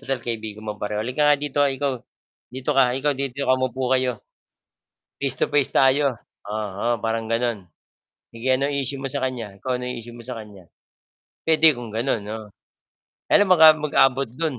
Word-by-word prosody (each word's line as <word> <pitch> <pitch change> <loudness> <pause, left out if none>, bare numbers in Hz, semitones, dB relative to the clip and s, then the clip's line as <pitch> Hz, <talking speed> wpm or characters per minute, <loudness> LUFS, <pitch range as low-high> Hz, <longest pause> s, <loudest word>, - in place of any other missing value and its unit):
total 135 -2 -2
kaibigan 110 -2 -5
mo 105 - -2
pareho, 105 0 -3
"Halika 125 +6 -1
nga 150 - +6
dito. 145 0 -1 0.2
Ikaw 140 -1 -1 0.6
dito 130 +2 -3
ka, 135 - +7
ikaw 145 +2 +1
dito 140 0 -3
ka. 130 - +5
Umupo 130 0 -2
kayo. 130 -1 +1 1.1
Face 135 -2 -1
to - - +2
face 145 -2 +2
tayo." 135 0 +3 0.3
Oo, 105 0 -3
oo, 120 - +1
parang 115 0 -1
gano'n. 115 -3 0 0.7
"Sige 115 +3 -6
anong 140 +2 -1
issue 140 0 -2
mo 135 - -5
sa - - -3
kaniya? 115 -6 -5
Ikaw - - -6
ano 125 - -7
'yong 125 0 -4
issue 120 +1 -11
mo - - -10
sa 125 -2 -5
kaniya?" 100 -4 -14 0.8
Puwede 160 0 +5
kung 120 -2 -7
gano'n, 115 -1 -1
'no? 110 0 -7 0.8
Kaya - - +7
lang 195 - -1
baka 160 -2 +9
mag-abot 135 -3 +2
do'n. 135 +2 -4
130 Hz, 185 wpm, -23 LUFS, 115-140 Hz, 1.1 s, baka